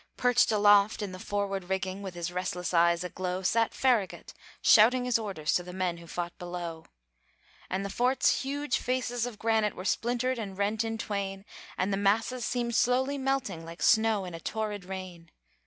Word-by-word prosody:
Perched 245 -1 +3
aloft 205 0 +4
in 200 - -4
the 185 - -8
forward 195 -1 -2
rigging, 190 +1 -3
With 190 -3 -7
his 175 0 -4
restless 180 0 -3
eyes 170 0 +4
aglow, 180 +1 -4
Sat 225 +4 +2
Farragut, 240 -7 0 0.3
shouting 245 +4 +6
his 245 -2 +2
orders 190 -8 -2
To - - +2
the 180 0 -9
men 180 -2 -1
who 170 0 -12
fought 175 0 -4
below. 175 -2 -6 0.8
And 195 +1 -2
the - - -3
fort's 250 +4 +2
huge 285 0 -1
faces 245 -1 -1
of 235 -4 -8
granite 220 -1 +1
Were 185 - -7
splintered 245 +3 0
and 195 -4 -6
rent 210 +2 0
in 225 0 -3
twain, 200 -2 -4 0.3
And 190 +2 0
the - - +1
masses 225 +5 +1
seemed 240 -1 -1
slowly 260 +4 +2
melting, 265 -10 -1
Like 165 +1 -8
snow 220 -3 +3
in 180 - -7
a 165 - -6
torrid 210 0 -4
rain. 185 -3 -8
200 Hz, 180 wpm, -29 LUFS, 180-235 Hz, 0.8 s, shouting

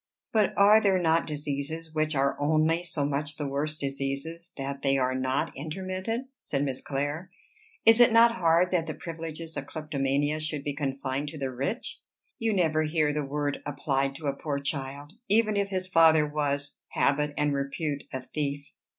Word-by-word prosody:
"But 215 -3 +2
are 210 +2 +7
there 195 -3 +3
not 165 -2 +2
diseases 150 +2 -4
which 155 0 0
are 140 0 +2
only 155 +3 +2
so 160 -5 0
much 145 +1 -2
the 145 - -2
worse 145 +3 -2
diseases 140 +5 -4
that 140 0 -4
they 135 -1 +2
are 130 -1 +1
not 130 +1 -1
intermittent?" 185 - -3
said 140 -1 -2
Miss 135 -2 -2
Clare. 145 +6 -3 0.6
"Is 225 +1 +8
it 240 - +7
not 230 +1 +7
hard 175 -3 +3
that 170 -3 +1
the - - -4
privileges 165 -1 -6
of - - -4
kleptomania 145 -1 -1
should 155 -2 -3
be 145 - -2
confined 140 0 -2
to 155 - -8
the 135 -2 -2
rich? 140 - -4 0.4
You 225 -1 +1
never 160 -6 +2
hear 155 -1 +1
the 150 0 -1
word 145 +1 -2
applied 135 -1 -1
to 155 - -8
a 140 - +1
poor 145 0 -3
child, 140 +1 -4 0.2
even 215 0 +3
if 200 -1 0
his 185 -1 -1
father 160 -4 +5
was, 145 -1 -1
habit 145 +1 +1
and 150 -1 +1
repute, 140 +1 -2
a 130 -1 -4
thief. 145 0 -4
150 Hz, 175 wpm, -28 LUFS, 140-165 Hz, 0.6 s, Is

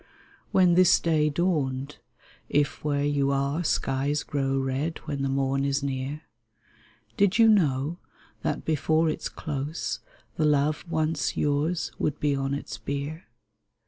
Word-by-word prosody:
When 180 -2 +5
this 180 0 +6
day 155 -2 +2
dawned 145 -4 -1 0.5
(if 145 -1 0
where 145 -1 0
you 145 -1 +1
are 140 +4 0
Skies 140 -1 0
grow 135 -1 -1
red 135 +4 -1
when 140 -2 -3
the 135 - 0
morn 135 0 0
is 140 0 0
near) 140 +2 -3 0.9
Did 200 0 +3
you 225 -1 +7
know 160 -6 +2 0.4
that - - -2
before 160 +1 +2
its - - -4
close 150 +2 -4 0.4
The 155 - +2
love 150 0 +2
once 155 -2 0
yours 150 +4 0
would 150 - -1
be 145 -1 +1
on 135 0 -1
its 140 - -6
bier 145 +4 -4
145 Hz, 140 wpm, -26 LUFS, 140-160 Hz, 0.9 s, you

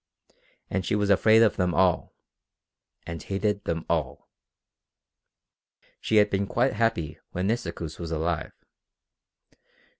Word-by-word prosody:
And 95 0 -1
she 100 - 0
was 105 -1 +1
afraid 110 +4 +6
of 110 - +2
them 90 -2 0
all, 90 -1 +2 0.9
and 85 -2 -6
hated 100 +1 -2
them 80 -1 -2
all. 75 -6 -2 1.7
She 110 - -1
had 105 -1 +5
been 100 0 0
quite 125 +6 +1
happy 85 -10 -1
when 90 +1 -2
Nisikoos 95 -8 -3
was 85 -1 -5
alive. 80 -1 -2
95 Hz, 120 wpm, -26 LUFS, 85-105 Hz, 1.7 s, afraid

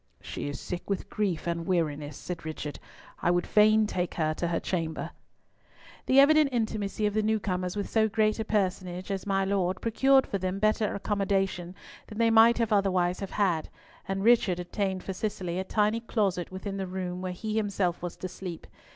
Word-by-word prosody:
"She - - -5
is 145 - -5
sick 180 +2 -6
with 195 - -3
grief 195 -7 -1
and 170 -1 -2
weariness," 150 -5 -1
said 175 -2 -6
Richard. 155 -2 -5 0.4
"I - - +2
would 175 0 +2
fain 215 +1 +5
take 180 -4 -2
her 155 -2 +1
to 170 - -2
her 170 0 0
chamber." 165 -3 -3 1.0
The 265 - +6
evident 305 +1 +6
intimacy 215 -3 -1
of 210 - +1
the 215 - +2
new 220 +1 +1
comers 185 -2 -2
with 205 - -2
so 220 -1 +2
great 215 0 +1
a - - 0
personage 185 -3 -1
as 195 0 -3
my 195 -1 +1
Lord 190 -2 0
procured 265 +4 +4
for 200 - -3
them 185 +1 -2
better 215 +1 +1
accommodation 195 -3 -1 0.3
than 215 - -9
they 230 0 +3
might 225 +1 +6
otherwise 185 -3 +2
have 195 - -5
had, 180 -6 0 0.4
and 195 0 -2
Richard 220 -6 +4
obtained 190 +1 -2
for 190 - -4
Cicely 185 -3 -3
a - - -1
tiny 210 +3 +1
closet 200 -7 -1
within 195 +1 -5
the 190 -1 -3
room 180 -1 -4
where 185 -1 -3
he 200 +5 -6
was 215 - 0
himself 200 -5 0
to 175 +1 -5
sleep. 180 -2 -7
195 Hz, 190 wpm, -28 LUFS, 180-215 Hz, 1.0 s, The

